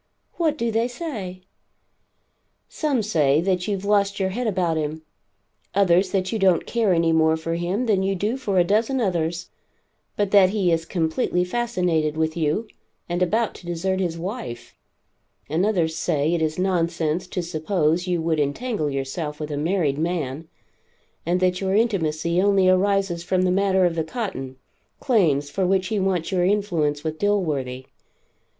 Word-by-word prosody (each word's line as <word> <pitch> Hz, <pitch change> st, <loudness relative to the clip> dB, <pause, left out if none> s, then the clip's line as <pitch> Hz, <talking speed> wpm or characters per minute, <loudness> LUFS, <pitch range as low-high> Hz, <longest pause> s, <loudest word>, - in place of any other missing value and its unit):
"What 315 Hz, -3 st, +1 dB
do 235 Hz, -4 st, -1 dB
they 225 Hz, +2 st, +1 dB
say?" 220 Hz, -, -6 dB, 1.2 s
"Some 280 Hz, -7 st, -1 dB
say 150 Hz, -8 st, +2 dB
that 180 Hz, 0 st, 0 dB
you've 200 Hz, -2 st, -2 dB
lost 200 Hz, -1 st, +2 dB
your 190 Hz, -1 st, +1 dB
head 240 Hz, +5 st, -2 dB
about 180 Hz, -5 st, 0 dB
him; 155 Hz, 0 st, -3 dB, 0.7 s
others 185 Hz, -1 st, +4 dB
that 185 Hz, -1 st, -1 dB
you 225 Hz, -, -1 dB
don't 185 Hz, -4 st, +3 dB
care 230 Hz, -4 st, +1 dB
any 165 Hz, -1 st, +3 dB
more 160 Hz, 0 st, +3 dB
for 165 Hz, +1 st, -3 dB
him 175 Hz, +8 st, -1 dB
than 205 Hz, -5 st, +2 dB
you 195 Hz, 0 st, 0 dB
do 210 Hz, +6 st, -1 dB
for 205 Hz, -8 st, -2 dB
a 180 Hz, -, +6 dB
dozen 220 Hz, +8 st, +1 dB
others, 175 Hz, -4 st, -1 dB, 0.6 s
but 205 Hz, -1 st, 0 dB
that 195 Hz, -3 st, +6 dB
he 190 Hz, -3 st, +1 dB
is 165 Hz, 0 st, 0 dB
completely 170 Hz, +1 st, 0 dB
fascinated 180 Hz, -8 st, 0 dB
with 160 Hz, 0 st, 0 dB
you 165 Hz, +7 st, 0 dB, 0.4 s
and 175 Hz, +1 st, -2 dB
about 215 Hz, +5 st, +1 dB
to 175 Hz, -, -13 dB
desert 185 Hz, +2 st, -1 dB
his 175 Hz, -3 st, -1 dB
wife; 175 Hz, -, -6 dB, 0.7 s
and 170 Hz, +7 st, +1 dB
others 170 Hz, -7 st, 0 dB
say 155 Hz, -1 st, 0 dB
it 170 Hz, -, 0 dB
is 155 Hz, 0 st, -1 dB
nonsense 170 Hz, -3 st, 0 dB
to 180 Hz, -1 st, -3 dB
suppose 170 Hz, +1 st, 0 dB
you 175 Hz, -2 st, 0 dB
would 160 Hz, -2 st, 0 dB
entangle 155 Hz, -, -1 dB
yourself 145 Hz, +3 st, -4 dB
with 150 Hz, -1 st, -5 dB
a -, -, -2 dB
married 155 Hz, -3 st, 0 dB
man, 160 Hz, -3 st, -2 dB, 0.8 s
and 175 Hz, +1 st, +2 dB
that 180 Hz, 0 st, +1 dB
your 190 Hz, 0 st, 0 dB
intimacy 170 Hz, -6 st, +1 dB
only 195 Hz, -1 st, +3 dB
arises 190 Hz, -1 st, +2 dB
from 185 Hz, +1 st, +1 dB
the 185 Hz, -, +2 dB
matter 190 Hz, -1 st, +3 dB
of 175 Hz, -, +1 dB
the 165 Hz, -1 st, -1 dB
cotton, 160 Hz, -, -5 dB, 0.4 s
claims, 155 Hz, -, +2 dB
for 190 Hz, -2 st, 0 dB
which 190 Hz, 0 st, +1 dB
he 215 Hz, -2 st, 0 dB
wants 185 Hz, -3 st, 0 dB
your 180 Hz, -2 st, +1 dB
influence 175 Hz, -7 st, 0 dB
with 155 Hz, -1 st, -4 dB
Dilworthy. 145 Hz, -11 st, -1 dB
180 Hz, 170 wpm, -23 LUFS, 160-200 Hz, 1.2 s, a